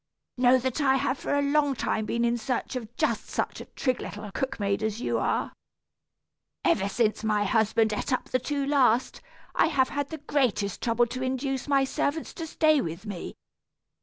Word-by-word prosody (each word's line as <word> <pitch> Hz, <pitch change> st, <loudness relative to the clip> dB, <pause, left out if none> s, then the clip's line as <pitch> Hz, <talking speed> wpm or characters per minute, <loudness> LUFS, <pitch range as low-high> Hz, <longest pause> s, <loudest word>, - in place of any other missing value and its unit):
"Know 250 Hz, 0 st, +5 dB
that 260 Hz, +3 st, -2 dB
I 265 Hz, -2 st, +4 dB
have 270 Hz, 0 st, 0 dB
for -, -, -1 dB
a 285 Hz, -, +2 dB
long 285 Hz, -1 st, +2 dB
time 215 Hz, -2 st, -1 dB
been 235 Hz, +2 st, 0 dB
in 235 Hz, 0 st, +2 dB
search 240 Hz, +2 st, -3 dB
of 235 Hz, -2 st, -6 dB
just -, -, 0 dB
such -, -, -2 dB
a -, -, -8 dB
trig 255 Hz, -2 st, -2 dB
little 210 Hz, 0 st, -7 dB
cook 265 Hz, +3 st, -3 dB
maid 200 Hz, 0 st, 0 dB
as 215 Hz, 0 st, -2 dB
you -, -, 0 dB
are. -, -, -1 dB, 1.1 s
Ever 200 Hz, -, +2 dB
since 215 Hz, +1 st, 0 dB
my 210 Hz, -1 st, +2 dB
husband 220 Hz, +1 st, +2 dB
ate 210 Hz, -, -3 dB
up 255 Hz, -, 0 dB
the 255 Hz, -, +1 dB
two 280 Hz, +2 st, -2 dB
last, 260 Hz, -4 st, +2 dB, 0.3 s
I -, -, +4 dB
have 270 Hz, -5 st, +2 dB
had 285 Hz, 0 st, -2 dB
the 320 Hz, -, -5 dB
greatest 255 Hz, -9 st, 0 dB
trouble 235 Hz, 0 st, +2 dB
to 255 Hz, +2 st, -6 dB
induce 265 Hz, +1 st, -2 dB
my 275 Hz, -1 st, +3 dB
servants 285 Hz, +3 st, -2 dB
to 330 Hz, -, -6 dB
stay 310 Hz, -2 st, +3 dB
with 170 Hz, +4 st, -5 dB
me. 200 Hz, -5 st, -6 dB
255 Hz, 195 wpm, -27 LUFS, 220-280 Hz, 1.1 s, Know